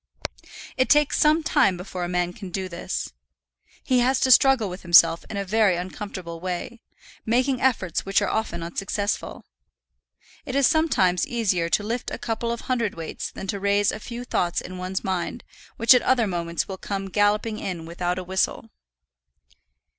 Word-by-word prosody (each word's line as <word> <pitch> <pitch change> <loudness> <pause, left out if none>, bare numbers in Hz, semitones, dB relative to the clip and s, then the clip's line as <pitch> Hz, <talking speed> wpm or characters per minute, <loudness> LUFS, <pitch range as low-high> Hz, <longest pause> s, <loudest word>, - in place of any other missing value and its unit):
It 260 - +2
takes 295 -1 +4
some 310 +2 +4
time 195 -10 +3
before 180 0 -6
a 175 - -3
man 180 0 -1
can 200 -3 -9
do 190 +1 -3
this. 170 - -5 0.7
He 255 -1 +2
has 255 +2 +2
to 260 - +3
struggle 260 -3 +5
with 180 +1 -7
himself 170 -1 +5
in 200 - -5
a 200 - -2
very 205 -1 +3
uncomfortable 180 -1 -6
way, 185 +6 -5 0.4
making 255 +3 +1
efforts 200 -10 +1
which 195 0 +2
are - - -1
often 170 -6 -2
unsuccessful. 195 +4 -3 1.0
It 260 - -5
is 280 -1 +4
sometimes 210 - +2
easier 190 -8 0
to 205 - +1
lift 235 +3 -3
a - - -5
couple 235 0 -3
of 235 - -5
hundredweights 225 -10 -3
than - - -7
to 200 +1 -3
raise 200 +1 +2
a - - -6
few 240 +2 -7
thoughts 175 -7 0
in 185 0 -8
one's 185 +1 -3
mind 190 +5 -3 0.3
which 230 +2 +7
at 250 - +4
other 250 -3 +2
moments 170 -3 -2
will 190 - -6
come 195 -1 -4
galloping 210 +2 +1
in 170 -4 -5
without 175 +2 -3
a 185 - -4
whistle. 185 -10 -2
200 Hz, 170 wpm, -24 LUFS, 180-235 Hz, 1.0 s, which